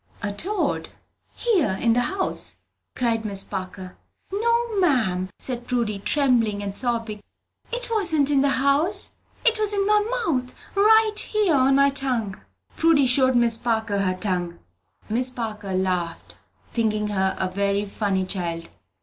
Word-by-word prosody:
"A 205 - -1
toad 385 - -2 0.5
here 345 - +1
in 230 -1 +2
the 245 - +2
house!" 375 +9 -3 0.4
cried 230 -3 0
Miss 200 -2 +2
Parker. 185 -1 -7 0.4
"No, 465 0 0
ma'am," 215 - +1
said 245 -2 -5
Prudy, 230 -5 -1
trembling 230 -5 +1
and 200 -1 -3
sobbing. 230 -2 -1 0.5
"It - - -3
wasn't 320 -10 +2
in 275 -2 +3
the 280 - +3
house, 295 +9 +2 0.3
it 460 -2 +3
was 425 -1 +1
in 400 -1 +1
my 420 +1 +4 0.3
mouth, 255 -7 -2 0.2
right 430 +1 +4
here 420 -6 +1
on 270 -1 +3
my 280 0 +5
tongue." 245 -8 -1 0.3
Prudy 320 -4 +3
showed 260 0 +3
Miss 235 -1 +4
Parker 220 -3 -1
her 185 -2 0
tongue. 180 -3 -2 0.5
Miss 250 +4 +2
Parker 215 -6 -5
laughed, 180 -3 -3 0.3
thinking 215 -2 0
her 190 -2 0
a 190 - -1
very 200 +1 0
funny 195 -2 -1
child. 170 -3 -4
240 Hz, 145 wpm, -23 LUFS, 200-315 Hz, 0.5 s, my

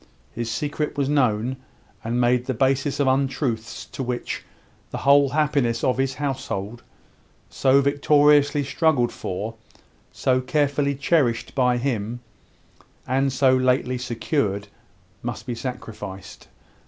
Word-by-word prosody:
His 115 0 -3
secret 150 +5 -3
was 140 -2 +1
known, 130 -3 +1 0.5
and 120 +2 -1
made 125 0 +2
the 130 - -1
basis 135 +4 +1
of 140 - +3
untruths 130 -4 -1
to - - -7
which 125 -1 -3 0.5
the - - -5
whole 140 0 +5
happiness 140 -5 +1
of 125 0 +1
his 135 -1 0
household, 125 -6 -4 0.7
so 135 +1 +4
victoriously 145 +1 +4
struggled 140 -3 +1
for, 105 +5 -5 0.6
so 130 0 +1
carefully 140 +1 +1
cherished 135 -5 +1
by 125 -2 +2
him, 120 -2 -2 0.9
and 135 +2 +1
so 130 0 +4
lately 130 0 +1
secured, 115 -4 -2 0.5
must 120 0 -5
be 125 - -3
sacrificed. 110 -6 -7
130 Hz, 120 wpm, -23 LUFS, 120-140 Hz, 0.9 s, whole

